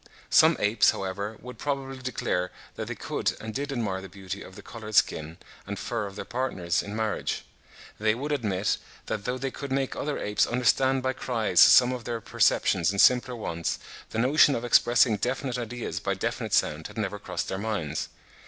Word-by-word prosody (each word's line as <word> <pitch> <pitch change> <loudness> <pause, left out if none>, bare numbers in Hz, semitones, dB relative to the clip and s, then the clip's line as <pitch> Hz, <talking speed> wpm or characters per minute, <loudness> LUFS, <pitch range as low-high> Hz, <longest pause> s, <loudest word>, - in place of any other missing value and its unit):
Some - - +6
apes, 105 +3 +4
however, 100 +3 -3
would 125 0 -10
probably 135 -2 -3
declare 110 -8 -2 0.3
that - - -5
they - - -4
could - - -2
and 110 0 -6
did 140 +4 -3
admire 105 -7 -2
the 95 - -9
beauty 95 +1 -7
of 95 - -11
the 105 - -11
coloured 110 -2 -8
skin 80 -2 +2 0.3
and 100 0 -4
fur 115 -4 -3
of 100 - -10
their - - -6
partners 90 -9 -1
in 100 +1 -7
marriage. 110 -1 -2 0.5
They 110 +1 +2
would 145 +5 -4
admit, 105 -8 0 0.3
that 100 -2 -4
though 125 +1 -1
they 135 0 -3
could 140 +1 -7
make 135 0 0
other 150 0 -2
apes 105 0 +1
understand 130 +2 +2
by 130 0 0
cries 110 -9 0
some 125 0 +8
of 125 -3 -5
their 120 -1 -2
perceptions 90 -5 +2
and 100 0 -2
simpler 125 +2 +5
wants, 85 -7 -3 0.3
the - - -5
notion 140 +4 +5
of 115 - -3
expressing 120 -2 +4
definite 125 +3 -2
ideas 120 0 -4
by - - -1
definite - - -1
sounds 75 +1 0
had - - -14
never 105 -1 -2
crossed - - -4
their 95 - -3
minds. 100 -8 -3
110 Hz, 190 wpm, -27 LUFS, 100-125 Hz, 0.5 s, some